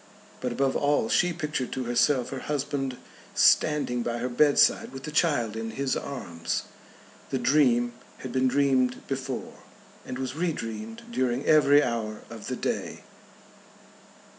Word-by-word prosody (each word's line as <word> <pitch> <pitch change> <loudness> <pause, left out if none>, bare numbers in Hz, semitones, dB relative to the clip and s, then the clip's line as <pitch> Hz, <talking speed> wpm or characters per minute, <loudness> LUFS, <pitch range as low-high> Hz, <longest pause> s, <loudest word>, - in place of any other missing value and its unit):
But 125 - -2
above 135 +2 0
all 145 -6 +2
she 180 - +3
pictured 150 -6 -3
to 130 - -2
herself 125 +2 +2
her 135 - -4
husband 135 -3 -2 0.4
standing 145 -5 +3
by 120 0 -2
her 125 +2 -2
bedside 140 +4 +3
with 135 0 -8
the 150 - -5
child 145 -9 +1
in 115 0 -4
his 135 +4 -1
arms. 85 -12 -4 0.7
The 135 - -1
dream 120 -2 +3 0.2
had 130 - -7
been 130 +1 +2
dreamed 130 -2 +2
before, 135 -1 -4 0.4
and 125 - -6
was 130 0 -4
re 170 +1 0
dreamed 115 -2 -6
during 125 +1 0
every 145 -1 +6
hour 110 -3 -3
of - - -8
the - - -2
day. - - -3
130 Hz, 145 wpm, -27 LUFS, 120-145 Hz, 0.7 s, every